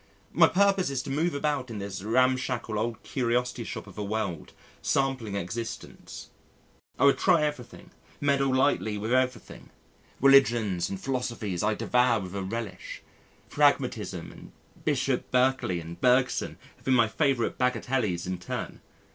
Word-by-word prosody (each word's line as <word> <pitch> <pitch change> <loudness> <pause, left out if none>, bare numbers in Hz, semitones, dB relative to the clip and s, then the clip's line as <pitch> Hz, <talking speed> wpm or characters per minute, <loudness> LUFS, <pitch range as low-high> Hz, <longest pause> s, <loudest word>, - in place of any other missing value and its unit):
My - - +6
purpose 195 -2 +2
is 135 -2 -2
to 135 - -6
move 160 +3 0
about 140 -3 -1
in 115 - -6
this 100 -1 -5
ramshackle, 120 -1 +1
old 115 +1 -3
curiosity 125 -1 -1
shop - - -6
of 100 0 -11
a - - -2
world 100 -5 -3 0.3
sampling 130 -7 0
existence. 100 +5 -6 0.7
I - - +3
would 140 - +5
try 170 -5 +4
everything, 145 -5 -5 0.3
meddle 140 -1 +2
lightly 130 -5 +1
with 110 +4 -2
everything. 130 -2 -1 0.5
Religions 115 -9 +4
and 95 - -5
philosophies 120 -6 -3
I 105 +1 +1
devour 125 -1 +2
with 90 -1 -7
a 100 - -3
relish, 100 -1 -6 0.5
Pragmatism - - +1
and - - -13 0.3
Bishop - - 0
Berkeley 125 -8 +1
and 85 +1 -9
Bergson 125 0 +2 0.2
have - - -25
been 130 - +3
my 115 -2 +4
favourite 135 0 0
bagatelles 125 -7 0
in 90 0 -4
turn. 90 - -6
120 Hz, 145 wpm, -27 LUFS, 105-135 Hz, 0.7 s, My